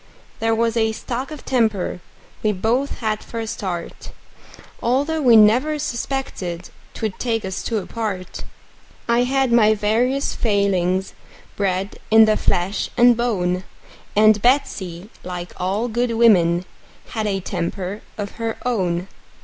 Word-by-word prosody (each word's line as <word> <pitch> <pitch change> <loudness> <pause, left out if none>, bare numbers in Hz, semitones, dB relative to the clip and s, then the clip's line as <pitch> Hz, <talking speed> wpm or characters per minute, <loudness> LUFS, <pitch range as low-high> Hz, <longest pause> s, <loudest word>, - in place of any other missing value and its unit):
There 225 0 +1
was 230 0 +1
a 220 -1 +2
stock 250 +4 -4
of 305 -3 -9
temper 220 -8 0 0.4
we 215 -1 +1
both 235 +10 -1
had 215 -1 -1
for 230 - -6
a 225 - -3
start, 185 -6 -5 0.7
Although 285 +6 +1
we 245 -4 +6
never 240 +8 +5
suspected 235 - -4 0.2
'twould 215 -4 -4
take 225 -4 -1
us 190 -1 -4
two 230 - -2
apart; 205 -2 -4 0.6
I 235 +1 +3
had 265 -1 +1
my 220 -2 +5
various 240 +7 +1
failings, 190 -3 0 0.4
bred 195 0 -2
in 220 0 +8
the 215 0 +3
flesh 185 +1 0
and 240 0 +6
bone; 185 -6 0 0.5
And 215 0 +5
Betsey, 205 -7 0
like 180 -1 -6
all 195 +6 -1
good 240 +1 -1
women, 180 -7 +4 0.4
had 220 -2 -2
a 195 -1 0
temper 185 +2 -4 0.2
of 205 -1 -4
her 225 0 -2
own. 185 -7 0
220 Hz, 135 wpm, -21 LUFS, 190-240 Hz, 0.7 s, in